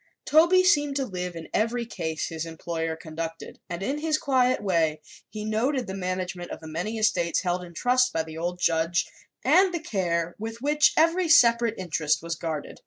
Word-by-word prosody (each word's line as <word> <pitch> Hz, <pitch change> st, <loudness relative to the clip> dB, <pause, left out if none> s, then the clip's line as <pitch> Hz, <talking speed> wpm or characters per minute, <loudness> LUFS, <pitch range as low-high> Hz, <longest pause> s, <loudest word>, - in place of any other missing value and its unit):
Toby 340 Hz, +4 st, +5 dB
seemed 290 Hz, -6 st, +3 dB
to 275 Hz, -1 st, 0 dB
live 180 Hz, -5 st, -5 dB
in 165 Hz, -1 st, -8 dB
every 235 Hz, +2 st, 0 dB
case 160 Hz, -8 st, -4 dB
his 165 Hz, -1 st, -4 dB
employer 165 Hz, 0 st, -4 dB
conducted 165 Hz, 0 st, -7 dB
and 175 Hz, +1 st, -4 dB
in 280 Hz, +8 st, -2 dB
his 310 Hz, 0 st, +1 dB
quiet 255 Hz, -4 st, +2 dB
way 165 Hz, -6 st, +1 dB, 0.3 s
he 210 Hz, +1 st, -6 dB
noted 245 Hz, +5 st, 0 dB
the 190 Hz, -, -6 dB
management 185 Hz, -1 st, -4 dB
of -, -, -7 dB
the 160 Hz, -, -11 dB
many 180 Hz, +8 st, -4 dB
estates 215 Hz, -6 st, +1 dB
held 180 Hz, 0 st, -1 dB
in 170 Hz, -1 st, -12 dB
trust 250 Hz, +3 st, +2 dB
by 160 Hz, -, -1 dB
the 160 Hz, 0 st, -10 dB
old 175 Hz, +2 st, -3 dB
judge 165 Hz, 0 st, +1 dB, 0.4 s
and 380 Hz, 0 st, +5 dB
the -, -, -1 dB
care 175 Hz, -, -1 dB
with 225 Hz, +2 st, -6 dB
which 295 Hz, +3 st, +3 dB
every 335 Hz, +2 st, +3 dB
separate 235 Hz, -5 st, +5 dB
interest 160 Hz, -4 st, -1 dB
was 170 Hz, 0 st, -3 dB
guarded. 160 Hz, -3 st, -5 dB
185 Hz, 185 wpm, -26 LUFS, 165-250 Hz, 0.4 s, Toby